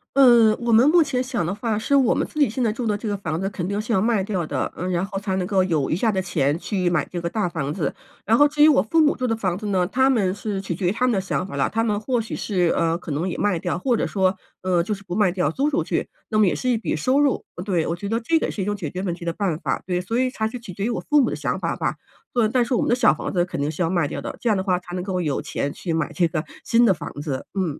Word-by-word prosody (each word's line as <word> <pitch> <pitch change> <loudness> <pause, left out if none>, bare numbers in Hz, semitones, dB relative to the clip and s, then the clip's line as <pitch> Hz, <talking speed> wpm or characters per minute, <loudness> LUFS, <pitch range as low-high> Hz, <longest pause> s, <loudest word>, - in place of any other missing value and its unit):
嗯， 235 -5 +6
我 235 -1 0
们 240 +6 +6
目 335 0 +6
前 260 -3 -1
想 250 -9 -2
的 175 - -1
话， 220 0 -2
是 280 +6 +1
我 265 -4 +4
们 - - 0
自 305 - -7
己 285 - +4
现 250 +3 -2
在 225 - +2
住 230 0 -3
的 210 - +1
这 220 - -6
个 205 - -1
房 160 -4 -3
子 195 - -1
肯 180 -2 -4
定 200 +1 -2
是 220 +2 -2
要 190 - +3
卖 220 -2 +2
掉 185 -5 -2
的， 145 -3 -2
嗯， 180 +2 -3
然 180 +1 0
后 195 0 -4
才 195 -1 -2
能 185 -1 -1
够 190 0 +2
有 160 -7 0
余 - - +2
下 220 +5 +1
的 190 - -1
钱 155 -5 0
去 185 -1 -1
买 175 -3 0
这 175 -1 -4
个 170 - -2
大 210 0 -1
房 155 -5 -3
子。 160 -1 -2 0.3
然 220 - +4
后 290 +5 +6
至 295 0 +2
于 305 - +9
我 285 -12 +5
父 270 +11 +1
母 300 -1 +4
住 255 -1 -2
的 225 - +1
房 185 -6 -1
子 210 +2 -5
呢， 185 -3 +1
他 260 +8 +2
们 200 -8 +2
是 205 -1 -4
取 195 -2 -4
决 180 +1 -2
于 - - +3
他 245 +5 0
们 250 - +3
的 195 - +1
想 185 -1 -2
法 185 - -8
了， 140 - +1
他 225 +1 0
们 210 -2 0
或 245 +2 -1
许 225 - -4
是， 180 -5 0
呃， 165 0 +1
可 170 -3 -8
能 160 +6 -1
也 - - -4
卖 200 -5 +1
掉， 175 -2 -2
或 240 +6 +1
者 - - 0
说， 190 -1 +1 0.3
呃， 180 -2 +2
就 190 - -4
是 195 - -14
不 180 - -6
卖 205 -4 +3
掉 175 -5 0
租 280 - 0
出 290 - 0
去， - - -2 0.2
那 215 -1 +1
么 210 - +5
也 - - +1
是 255 - -4
一 240 -2 +3
笔 220 - -2
收 255 - +2
入， 290 -2 +1 0.2
对， 180 -5 0
我 165 - -1
觉 200 +3 -6
得 230 - 0
这 320 +8 +1
个 - - -1
是 195 - -3
一 - - -3
种 205 - -1
解 170 -8 -5
决 185 +4 -5
问 180 -3 -1
题 170 - -9
的 170 - -1
办 180 -6 -1
法。 - - -2
对， 180 -1 -1
所 225 +6 -2
以 255 0 +1
才 220 -4 -1
是 240 +2 -6
取 200 -6 -9
决 195 +3 -5
于 235 - 0
我 235 - -2
父 295 -1 +5
母 - - +2
的 - - -3
想 - - -2
法 - - -2
吧， - - -1 0.4
所 240 -2 +2
以， 215 - +2
但 245 -1 +2
是 260 - -2
我 240 - +2
们 - - 0
的 240 - +4
小 250 -2 +4
房 155 - -5
子 175 -1 +1
肯 175 - -5
定 145 - 0
是 160 +3 -2
要 165 - 0
卖 175 -5 +1
掉 - - -5
的， - - -6
这 235 - +1
样 210 - +3
的 190 - -1
话 185 -2 +1
才 175 0 -9
能 180 - -3
够 185 -2 -2
有 150 -5 -1
钱 140 - -3
去 170 +1 -4
买 165 0 -1
这 170 +2 +2
个 155 -1 -2 0.2
新 235 +1 +4
的 225 - +5
房 - - -7
子， 140 -4 -4
嗯。 180 -7 -2
195 Hz, 360 characters per minute, -23 LUFS, 175-230 Hz, 0.4 s, 于